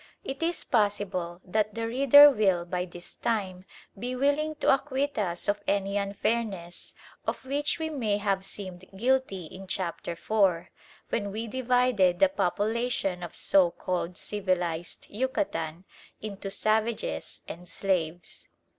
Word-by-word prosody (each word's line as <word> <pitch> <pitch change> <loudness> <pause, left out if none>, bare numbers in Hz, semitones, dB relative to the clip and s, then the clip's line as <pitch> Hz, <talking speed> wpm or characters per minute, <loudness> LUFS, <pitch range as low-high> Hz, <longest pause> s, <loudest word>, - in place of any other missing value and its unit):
It 275 -6 -5
is 335 +1 0
possible 200 -5 0
that 215 +2 0
the 230 0 -2
reader 275 +4 +8
will 190 -7 +2
by 180 0 -2
this 175 -1 -9
time 190 -5 -2 0.3
be 245 +5 -4
willing 285 +4 +1
to 295 - +4
acquit 275 -1 -1
us 175 -4 -1
of 205 0 +1
any 200 0 +1
unfairness 200 -2 -2 0.3
of - - -2
which 290 +4 0
we 320 -1 -3
may 225 -8 0
have 200 -2 0
seemed 185 -2 -7
guilty 245 -6 +1
in 190 +4 -10
Chapter 175 -2 -3
IV., 185 -1 +1 0.4
when 205 -3 -1
we 220 +3 -3
divided 245 -6 +2
the 290 - +5
population 215 -4 0
of 175 - -7
so 190 -3 +4
called 175 0 -3
civilised 180 -5 -2
Yucatan 200 - -2 0.3
into 200 -2 -6
"Savages" 220 - -1
and 175 +1 -9
"Slaves." 175 -2 -2
205 Hz, 135 wpm, -28 LUFS, 180-250 Hz, 0.4 s, reader